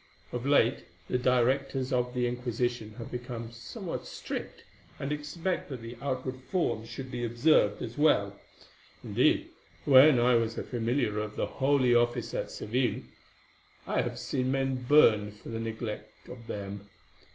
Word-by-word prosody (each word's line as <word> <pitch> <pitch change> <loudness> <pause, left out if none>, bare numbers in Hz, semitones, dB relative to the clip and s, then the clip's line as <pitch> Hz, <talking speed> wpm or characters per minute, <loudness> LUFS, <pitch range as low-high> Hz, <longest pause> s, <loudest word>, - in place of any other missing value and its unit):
Of 125 +2 -3
late 135 -3 +3 0.2
the 125 - 0
directors 130 +2 +1
of 125 0 0
the 125 0 +1
Inquisition 120 -2 -2
have 115 - -8
become 120 -2 -6
somewhat 115 -1 -6
strict, - - -6 0.3
and 140 - -4
expect 150 +5 -3
that 130 -5 -6
the 115 +1 -7
outward 130 -1 -3
forms 115 -11 -1
should 130 +2 -7
be 120 -1 -3
observed 120 -2 +3
as 120 +4 -6
well. 100 -10 +3 0.7
Indeed, - - +2 0.3
when 135 0 +8
I 125 +1 +4
was 115 -1 +1
a - - -2
familiar 120 -2 -1
of 105 0 -4
the - - 0
Holy 135 -2 +2
Office 120 0 +1
at - - -2
Seville, 120 +2 -1 0.8
I - - +1
have - - -4
seen 130 0 -1
men 135 -2 -1
burned 105 -8 +5
for 105 - -12
the 115 -1 -4
neglect 110 -1 -6
of 120 -2 -10
them. 100 0 -6
125 Hz, 150 wpm, -29 LUFS, 115-130 Hz, 0.8 s, when